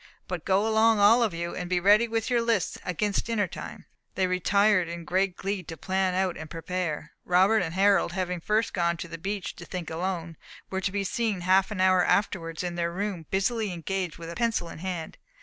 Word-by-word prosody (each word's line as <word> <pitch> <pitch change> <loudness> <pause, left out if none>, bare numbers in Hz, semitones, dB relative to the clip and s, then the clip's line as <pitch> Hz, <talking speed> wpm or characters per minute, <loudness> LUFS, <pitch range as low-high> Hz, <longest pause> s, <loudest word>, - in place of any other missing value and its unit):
But 180 -3 -5
go 195 +3 +2
along 220 0 +4
all 215 +4 +6
of 225 -3 +2
you, 170 0 -4
and 180 -1 -5
be 180 -1 +2
ready 205 +5 +5
with 225 -1 -1
your 240 -1 +3
lists 230 -6 0
against 200 +3 -1
dinner 225 -3 +1
time." - - -9 0.3
They 190 - +2
retired 185 +1 +3
in 170 0 -6
great 185 +1 0
glee 195 0 -2
to 165 -1 -9
plan 190 +3 0
out 185 -2 0
and 160 -1 -8
prepare. 165 -2 -4
Robert 190 +5 +4
and 165 -1 -3
Harold, 195 -2 +3
having 180 -2 -2
first 215 +4 0
gone 170 -2 +1
to 170 - -6
the 165 0 -8
beach 195 +1 -4
to 175 - -9
think 175 -2 -6
alone, 170 -1 -3 0.3
were 190 0 -2
to 190 - -1
be 200 0 -1
seen, 210 -1 -1
half 190 +3 +3
an 210 -3 -5
hour 185 -1 +5
afterwards, 165 -5 0
in 175 -1 -3
their 170 0 -1
room, 185 -3 -4
busily 205 +2 0
engaged 180 0 -3
with 170 0 -7
pencil 230 -7 0
in - - -9
hand. 175 -2 -5
185 Hz, 210 wpm, -27 LUFS, 170-205 Hz, 0.3 s, all